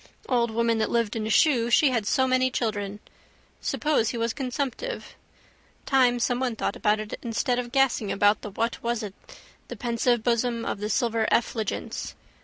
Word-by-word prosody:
Old 240 -2 +2
woman 230 0 +1
that 220 - 0
lived 230 -2 0
in 220 -1 -2
a - - -3
shoe 235 -1 +3
she 270 +3 +5
had 225 -4 -1
so 260 - +3
many 255 0 +2
children. 205 -4 -2 0.6
Suppose 295 -7 +1
he 240 - -4
was 230 0 -1
consumptive. 275 - -4 0.7
Time 250 -3 +3
someone 245 0 0
thought 200 - -2
about 210 +1 +1
it 215 0 -6
instead 245 +1 0
of 240 -1 -5
gassing 260 -6 +2
about 205 +1 +3
the 210 - -6
what 230 +4 -2
was 235 -1 -1
it 200 -3 -6 0.5
the - - -7
pensive 240 -1 0
bosom 235 -1 0
of - - -3
the 210 +1 -3
silver 225 -1 +1
effulgence. 220 -2 -1
235 Hz, 175 wpm, -26 LUFS, 220-250 Hz, 0.7 s, she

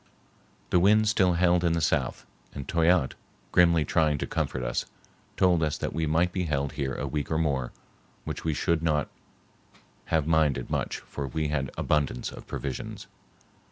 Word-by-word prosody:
The 90 - +5
wind 105 +4 +4
still 95 -4 +3
held 90 0 +3
in 85 -1 +2
the 85 - +1
south, 80 - 0 0.3
and 70 - -6
Toyatte, 85 -3 +3 0.4
grimly 85 -3 +4
trying 75 -1 +2
to - - -2
comfort 65 - -2
us, - - -2 0.5
told 90 -3 +4
us 75 -2 0
that - - -3
we 80 +1 -1
might 85 +4 +2
be 90 -1 -1
held 70 -3 -1
here 70 -2 -3
a - - -3
week 75 -2 -3
or 80 - 0
more, 70 -6 0 0.5
which - - -5
we 80 -2 0
should 85 +1 +1
not 75 -3 +1 1.0
have 80 -3 +1
minded 80 -3 +1
much, - - -1
for 70 -1 -6
we 75 +3 -2
had 70 -3 -1
abundance 75 -4 0
of - - -11
provisions. 65 -2 -5
80 Hz, 170 wpm, -27 LUFS, 70-85 Hz, 1.0 s, The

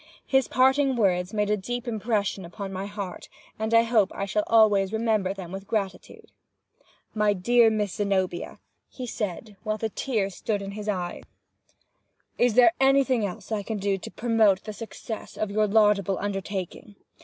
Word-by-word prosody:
His 265 -1 +2
parting 265 +1 +3
words 180 -5 +1
made 210 -1 0
a - - +4
deep 245 +4 -5
impression 215 -3 -1
upon 195 +3 -7
my 190 +1 -4
heart, 200 -3 -7 0.3
and 220 +1 -2
I 230 0 +6
hope 225 -4 +2
I 195 - -2
shall 210 +1 0
always 205 -4 +4
remember 220 -4 +1
them 190 -3 -7
with 195 +1 -7
gratitude. 195 -4 -4 0.8
"My 210 -1 +2
dear 230 +5 +4
Miss 210 -3 -1
Zenobia," 190 -4 -1 0.3
he 255 - -7
said, 210 -2 -5
while 215 -1 -2
the 220 +1 -2
tears 210 -5 -2
stood 205 +1 -2
in 195 - -6
his 210 +1 -5
eyes, 180 -3 -3 1.2
"is 240 -3 +3
there 250 +7 +6
anything 270 -3 +3
else 185 - -9
I 215 -2 0
can 215 +2 -4
do 195 -1 -1
to - - -8
promote 220 -2 +2
the 215 - -6
success 225 0 -8
of 215 -2 -2
your 215 +1 +2
laudable 200 -3 +3
undertaking? 195 0 -5
210 Hz, 165 wpm, -26 LUFS, 195-225 Hz, 1.2 s, I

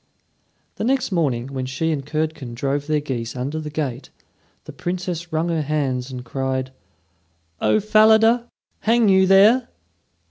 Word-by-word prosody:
The - - -3
next 260 -1 0
morning, 135 -8 0
when 130 -1 -3
she 150 +5 -1
and 145 -3 -2
Curdken 150 -4 -3
drove 140 +3 -2
their 155 -1 +1
geese 120 -5 -4
under 135 +5 -3
the 155 -1 -6
gate, 145 -5 -4 0.6
the - - -10
Princess 175 -1 -4
wrung 160 +2 0
her 165 -2 0
hands 135 -4 -2
and 125 -2 -7
cried: 130 0 -3 0.9
"O 215 - +3
Falada, 220 +3 +4 0.3
hang 230 -1 +3
you 190 0 +5
there?" 215 +6 +5
155 Hz, 145 wpm, -21 LUFS, 130-195 Hz, 0.9 s, you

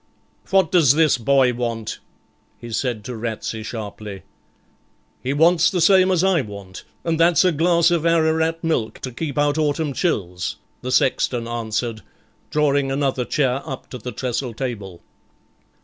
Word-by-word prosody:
'What 190 -4 +3
does 150 -7 +5
this 155 -5 +3
boy 130 +1 +3
want?' 115 -2 -4 0.6
he 120 - -10
said 115 -2 -2
to 125 - -5
Ratsey 110 0 -4
sharply. 105 -3 -7 1.0
'He 130 - -2
wants 165 +4 +4
the 185 - -1
same 185 +2 +5
as 185 -2 +2
I 190 -5 +3
want, 100 -4 -9 0.2
and 165 -1 -1
that's 170 +2 +4
a 180 - +4
glass 170 +2 +3
of 170 -2 +1
Ararat 165 0 +2
milk 155 -9 -1
to 130 - -5
keep 145 +4 -5
out 145 +1 +2
autumn 150 -1 0
chills,' 90 - -2 0.3
the 125 - -4
sexton 125 -2 +1
answered, 115 -1 -3 0.5
drawing 140 -2 +1
another 135 -2 0
chair 135 -2 0
up 135 -4 -8
to 125 - -6
the 125 +2 -6
trestle 125 -2 -3
table. 105 -9 -5
135 Hz, 150 wpm, -21 LUFS, 115-160 Hz, 1.0 s, does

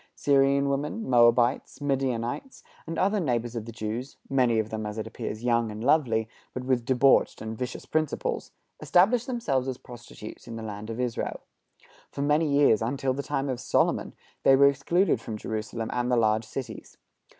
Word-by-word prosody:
Syrian 140 0 +3
women, 150 +11 -2
Moabites, 120 +1 +3
Midianites, 135 - -2 0.2
and 165 0 -4
other 200 +3 +2
neighbors 120 -7 -1
of 115 -2 -4
the 115 - -7
Jews 115 +4 -5
many 125 -4 +3
of 110 0 -1
them, 110 0 -3
as 105 +1 -6
it 110 - -3
appears, 110 +2 -6
young 120 -2 +2
and 105 +1 -7
lovely, 125 -6 +2 0.3
but 130 - -3
with 125 -2 0
debauched 130 +2 +3
and 110 0 -5
vicious 125 +2 -5
principles 155 -2 -2 0.3
established 220 +8 +3
themselves 145 - -1
as 130 -2 -3
prostitutes 120 -3 -11
in 115 - -6
the 115 - -6
land 105 0 -6
of 115 +1 -5
Israel. 125 -2 -2 0.7
For 140 - -4
many 150 +2 +2
years, 140 -6 +4
until 130 +3 -1
the 140 - -3
time 140 -1 -2
of 130 -3 -2
Solomon, - - 0 0.3
they 135 - +6
were 140 +1 +7
excluded 170 +8 +1
from 110 -2 -5
Jerusalem 110 +1 -4
and 125 0 -1
the 125 - +3
large 110 -1 +2
cities. 130 +3 -7
125 Hz, 175 wpm, -27 LUFS, 115-140 Hz, 0.7 s, were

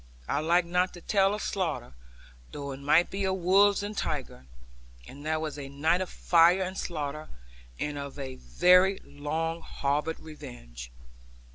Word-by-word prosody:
I 140 - 0
like 170 +3 +3
not 180 +2 0
to 175 - -11
tell 195 +1 +2
of 210 - -5
slaughter, 170 - -2 0.6
though 140 -1 -5
it 135 - -7
might 150 +5 +3
be 195 +1 -2
of 190 0 +1
wolves 195 +3 +4
and 210 +1 -5
tigers; 65 - -4 0.6
and 140 +2 -11
that 155 0 0
was 155 -2 -4
a 135 -1 -7
night 160 +6 +1
of 185 - -3
fire 175 +2 +4
and 185 +1 -5
slaughter, 155 -4 -4 0.5
and 145 -1 -3
of 140 -1 -7
very 150 - +3
long 160 +3 -3
harboured 150 +3 -2
revenge. - - -10
160 Hz, 155 wpm, -28 LUFS, 140-180 Hz, 0.6 s, wolves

